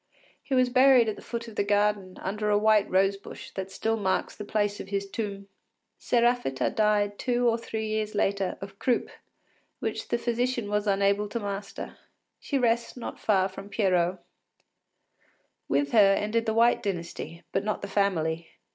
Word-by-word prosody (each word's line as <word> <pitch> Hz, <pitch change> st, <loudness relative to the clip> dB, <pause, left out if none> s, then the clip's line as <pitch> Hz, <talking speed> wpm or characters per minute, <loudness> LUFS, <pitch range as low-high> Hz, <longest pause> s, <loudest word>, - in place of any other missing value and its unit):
He 270 Hz, -, -2 dB
was 255 Hz, -1 st, +4 dB
buried 255 Hz, -2 st, +6 dB
at 215 Hz, -, -3 dB
the -, -, -12 dB
foot 235 Hz, 0 st, -5 dB
of 225 Hz, -, -10 dB
the 205 Hz, -, +1 dB
garden, 205 Hz, -2 st, +1 dB
under 210 Hz, +2 st, -2 dB
a 205 Hz, -, +4 dB
white 215 Hz, -1 st, +3 dB
rosebush 195 Hz, +1 st, -1 dB
that 190 Hz, 0 st, -5 dB
still 225 Hz, +3 st, -1 dB
marks 190 Hz, -3 st, -1 dB
the 210 Hz, -, -7 dB
place 205 Hz, -1 st, -1 dB
of -, -, -7 dB
his 200 Hz, 0 st, -2 dB
tomb. 200 Hz, -1 st, -5 dB, 0.5 s
Séraphita 240 Hz, -, +1 dB
died 205 Hz, -1 st, +1 dB
two 245 Hz, -1 st, +1 dB
or 230 Hz, -, +3 dB
three 225 Hz, -1 st, -4 dB
years 215 Hz, 0 st, -2 dB
later, 200 Hz, -2 st, 0 dB
of 195 Hz, 0 st, -9 dB
croup, 245 Hz, -2 st, 0 dB, 0.7 s
which -, -, -4 dB
the 235 Hz, -, 0 dB
physician 240 Hz, -2 st, -1 dB
was 210 Hz, 0 st, 0 dB
unable 200 Hz, +1 st, +2 dB
to 235 Hz, -, -3 dB
master. 200 Hz, -1 st, -6 dB, 0.4 s
She 280 Hz, -, -2 dB
rests 235 Hz, -1 st, +1 dB
not 245 Hz, -, -6 dB
far 190 Hz, -3 st, +2 dB
from 195 Hz, +1 st, -10 dB
Pierrot. 185 Hz, -3 st, +1 dB, 1.5 s
With 140 Hz, 0 st, +1 dB
her 200 Hz, -3 st, +6 dB
ended 225 Hz, +3 st, -1 dB
the 220 Hz, -, 0 dB
White 235 Hz, +1 st, +4 dB
Dynasty, 170 Hz, -4 st, -5 dB
but -, -, 0 dB
not 215 Hz, 0 st, -2 dB
the -, -, -3 dB
family. 165 Hz, -5 st, 0 dB
205 Hz, 170 wpm, -27 LUFS, 195-230 Hz, 1.5 s, buried